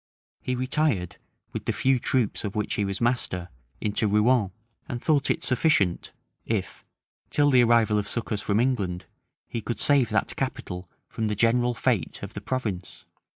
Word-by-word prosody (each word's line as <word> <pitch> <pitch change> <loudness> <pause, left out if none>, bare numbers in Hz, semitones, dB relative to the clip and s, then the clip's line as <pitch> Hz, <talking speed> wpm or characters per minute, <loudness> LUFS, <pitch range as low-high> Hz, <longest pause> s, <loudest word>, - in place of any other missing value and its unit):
He 125 - -2
retired, 130 - 0 0.4
with - - -5
the - - +1
few 130 -1 +2
troops 120 -3 0
of 100 -2 -4
which 105 -1 -1
he 105 - 0
was 100 0 -3
master, 115 -7 0 0.3
into 105 +1 0
Rouen; 105 +1 +3 0.4
and 120 - -3
thought 145 0 +2
it - - 0
sufficient, 125 - +2 0.3
if, - - -3 0.5
till 145 -1 +3
the 125 -2 +6
arrival 115 -3 +4
of 100 - -3
succors 110 -2 -2
from 105 0 +1
England, 100 -8 0 0.4
he 115 - -4
could 120 +2 -4
save 140 -5 +4
that - - 0
capital 90 0 -4 0.2
from 110 - -3
the 105 - -1
general 120 +3 +2
fate 115 -10 -1
of - - -6
the - - -6
province. 105 -9 -4
115 Hz, 165 wpm, -26 LUFS, 100-130 Hz, 0.5 s, the